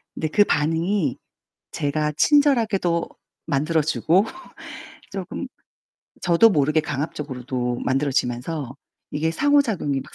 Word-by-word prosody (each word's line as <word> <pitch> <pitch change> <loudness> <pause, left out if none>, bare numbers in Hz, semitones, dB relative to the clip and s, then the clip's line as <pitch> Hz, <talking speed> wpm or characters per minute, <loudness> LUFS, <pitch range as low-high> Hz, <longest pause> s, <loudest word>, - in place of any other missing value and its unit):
근데 160 - -2
그 205 +6 +5
반응이 160 0 0 0.6
제가 150 +1 -1
친절하게도 225 - +2 0.4
만들어주고 160 +5 +1 0.9
쪼금 - - -5 0.8
저도 175 +5 +5
모르게 155 -2 +2
강압적으로도 130 -5 -4
만들어지면서 135 +1 -1 0.4
이게 155 +2 0
상호작용이 225 - +1
막 - - -13
155 Hz, 265 characters per minute, -23 LUFS, 140-180 Hz, 0.9 s, 그